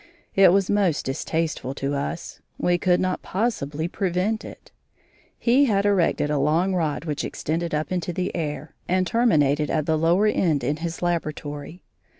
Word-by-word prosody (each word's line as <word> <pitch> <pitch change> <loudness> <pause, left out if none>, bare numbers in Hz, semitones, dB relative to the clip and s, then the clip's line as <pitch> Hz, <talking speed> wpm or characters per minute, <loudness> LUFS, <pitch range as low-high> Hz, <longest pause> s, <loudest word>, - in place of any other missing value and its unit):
It 195 -2 +6
was 195 0 +3
most 195 -7 +1
distasteful 145 0 -2
to 140 +1 -2
us; 145 +4 -4 0.2
we 175 0 +1
could 180 0 +3
not 185 0 -1
possibly 165 -8 -2
prevent 190 +4 -1
it. - - -12 0.7
He 255 +4 +4
had 200 -5 +1
erected 180 -6 +2
a 150 - +1
long 165 +7 +2
rod 160 -3 -1
which 150 -3 -2
extended 165 +1 -2
up 155 +3 -2
into 180 -1 -1
the 180 +2 -3
air, 155 -2 -4
and 185 +1 +2
terminated 150 - +2
at 155 -2 0
the 160 -1 +1
lower 170 +6 +3
end 165 - +1
in 145 +4 0
his 165 +1 -5
laboratory. 155 -1 -3
170 Hz, 160 wpm, -24 LUFS, 150-185 Hz, 0.7 s, It